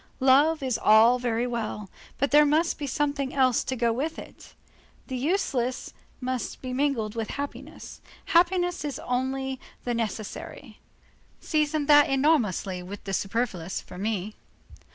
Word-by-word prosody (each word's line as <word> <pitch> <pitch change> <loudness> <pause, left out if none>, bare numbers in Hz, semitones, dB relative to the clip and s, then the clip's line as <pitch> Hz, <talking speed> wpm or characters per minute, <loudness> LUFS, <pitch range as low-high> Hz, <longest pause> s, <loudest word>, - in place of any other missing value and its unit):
"Love 285 +4 +4
is 255 -3 -1
all 225 +4 +6
very 240 -1 0
well; 220 -4 -4 0.3
but 280 - 0
there 295 +1 +7
must 310 +4 +1
be 290 - -3
something 280 0 -1
else 255 -3 +3
to 260 - -3
go 235 -2 +1
with 300 +7 -3
it. - - -12 0.5
The 260 - -5
useless 255 -4 -1 0.3
must 255 -1 -4
be 255 -1 -5
mingled 255 -6 0
with 225 -2 -4
happiness. 285 0 -7 0.2
Happiness 355 0 +2
is 290 -2 -3
only 265 +1 -2 0.2
the 245 - -1
necessary. 220 -2 -5 0.6
Season 305 -1 0
that 290 0 +6
enormously 255 - +1
with 190 +3 -9
the 195 - -5
superfluous 195 -4 -2
for 180 - -11
me. 210 0 -2
255 Hz, 140 wpm, -26 LUFS, 225-290 Hz, 0.6 s, there